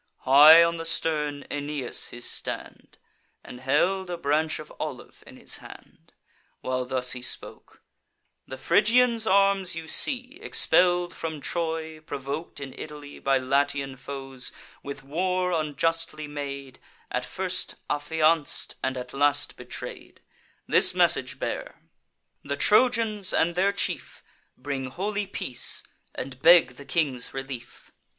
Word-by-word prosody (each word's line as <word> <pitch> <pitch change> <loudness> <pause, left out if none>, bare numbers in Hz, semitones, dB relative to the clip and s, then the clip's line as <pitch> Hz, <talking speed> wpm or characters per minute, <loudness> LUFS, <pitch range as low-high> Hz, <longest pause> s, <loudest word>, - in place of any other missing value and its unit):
High 150 +5 +9
on 170 0 0
the 165 - -4
stern 150 -3 0
Aeneas 145 -3 -1
took - - -6
his 120 - -5
stand, - - -5 0.5
And 125 - -10
held 180 +8 +1
a 175 - -3
branch 155 0 0
of - - -10
olive - - -7
in - - -13
his - - -3
hand, - - -15 0.5
While 130 0 -2
thus 125 -1 -1
he 125 - -3
spoke: 120 - -4 0.6
"The 130 - -7
Phrygians' 230 - +3
arms 195 -2 +3
you 165 -1 -7
see, 255 - +1
Expell'd 180 - +3
from 160 -2 -5
Troy, 160 0 -3
provok'd 145 +1 -6
in 135 -2 -7
Italy 150 -1 -9
By 135 0 +2
Latian 140 +1 0
foes, 135 -1 -4 0.3
with 140 0 -8
war 180 +5 -1
unjustly 160 0 -1
made; 140 -2 -7 0.3
At 125 - -1
first 185 +7 -2
affianc'd, 155 +1 +1
and 130 0 -1
at 125 0 -7
last 145 +1 +1
betray'd. - - -9 0.5
This - - +4
message - - +3
bear: - - -5 0.6
'The 140 0 -3
Trojans 215 - +3
and 170 +1 +2
their 190 +3 +2
chief 200 - -3 0.3
Bring 135 -2 -4
holy 200 +9 -3
peace, 130 -9 +1 0.3
and 130 0 -7
beg 170 -1 +7
the 140 - -10
king's 135 -9 -1
relief. 135 -3 -7
150 Hz, 130 wpm, -26 LUFS, 135-175 Hz, 0.6 s, High